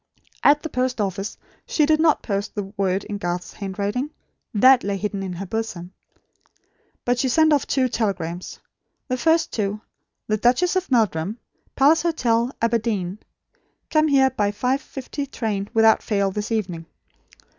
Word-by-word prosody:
At 295 +1 +5
the 320 - -4
post 255 -2 -1
office 195 0 -2 0.3
she 305 - +2
did 310 +1 +3
not 315 -2 +3
post 200 -1 -3
the 200 -1 -5
word 195 -1 0
in 205 -1 -5
Garth's 175 -1 -3
handwriting. 205 +7 -3 0.4
That 255 +4 +6
lay 200 0 -1
hidden 200 0 -3
in 190 -2 -4
her 185 +3 -5
bosom. 190 -3 -4 1.1
But 245 0 +1
she 260 - +1
sent 315 +4 +4
off 285 - +1
two 260 -2 +2
telegrams. 185 -7 -3 0.5
The 255 - 0
first 320 +3 +2
to 205 -1 -1 0.5
The 215 - 0
Duchess 250 - +2
of 370 0 -1
Meldyum, 215 - +1 0.4
Palace 300 +4 +5
Hotel, 245 -8 +1
Aberdeen. 215 -5 0 0.7
"Come 310 0 +4
here 270 -2 +4
by 210 -5 0
5.50 270 +4 -3
train 205 -6 -3
without 225 -1 +5
fail 200 -3 0
this 210 +3 -4
evening." 180 -7 -2
225 Hz, 150 wpm, -23 LUFS, 200-265 Hz, 1.1 s, That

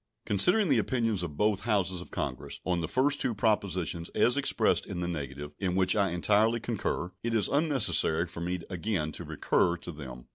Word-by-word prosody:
Considering 180 - +4
the 130 -5 +4
opinions 115 -3 0
of 80 -5 -5
both 105 -2 +2
Houses 95 -5 0
of - - -11
Congress - - -4
on 90 -1 0
the 80 - -2
first 145 - +1
two 120 - 0
propositions 95 -6 0
as 120 - +3
expressed 140 -1 +1
in 90 - -5
the 90 - -2
negative, 75 -3 -5
in 90 -2 -1
which 95 +1 +3
I 100 -2 +2
entirely 105 +6 +2
concur, 105 -5 -3
it 115 0 -1
is 105 - +3
unnecessary 110 - +2
for 85 -1 -8
me 90 +1 -3
again 90 -3 -2
in - - -7
to - - -7
recur 85 0 +1
to 85 - -8
them. 65 -6 -9
95 Hz, 195 wpm, -29 LUFS, 85-115 Hz, -, Considering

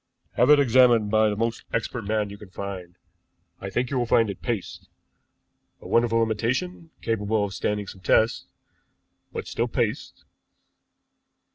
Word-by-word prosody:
"Have 125 - +2
it 150 -1 +7
examined 120 -5 +4
by 110 0 +4
the 105 - -2
most 115 +2 -2
expert 115 0 -3
man 105 -1 -1
you 100 - -9
can 105 - -12
find. 95 -2 -7 0.6
I 95 - -6
think 120 +6 -2
you 130 - 0
will 120 - -1
find 115 -3 +3
it 95 - -10
is - - -26
paste, 115 -7 -4 0.9
a - - -11
wonderful 115 -1 +3
imitation, 125 - -2
capable 110 -1 0
of 100 - -6
standing 105 +1 -2
some 95 -1 -11
tests 110 +4 +2 0.9
but - - -5
still - - -2
paste." - - -3
110 Hz, 155 wpm, -25 LUFS, 105-120 Hz, 0.9 s, it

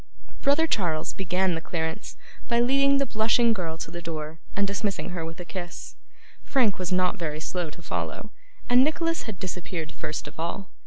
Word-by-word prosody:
Brother 285 +3 +4
Charles 170 - +1
began 185 0 +1
the 165 - -2
clearance 160 +3 -3 0.3
by 235 -1 +3
leading 275 +3 +5
the 275 - +3
blushing 230 0 +4
girl 165 -6 -3
to - - -5
the 175 - -5
door, 160 -1 -5 0.2
and 200 - +3
dismissing 200 -2 -1
her 175 -2 -3
with 165 +1 -6
a 175 - -5
kiss. 175 -1 -6 0.5
Frank 235 -9 +3
was 185 0 -2
not 185 0 +3
very 155 -3 -2
slow 175 +1 -2
to 170 +3 -12
follow, - - -3 0.4
and 245 +1 +7
Nicholas 330 -2 0
had 195 -4 -6
disappeared 175 -3 -4
first 150 -1 -4
of 145 - -11
all. 170 +4 -3
185 Hz, 180 wpm, -27 LUFS, 165-230 Hz, 0.5 s, and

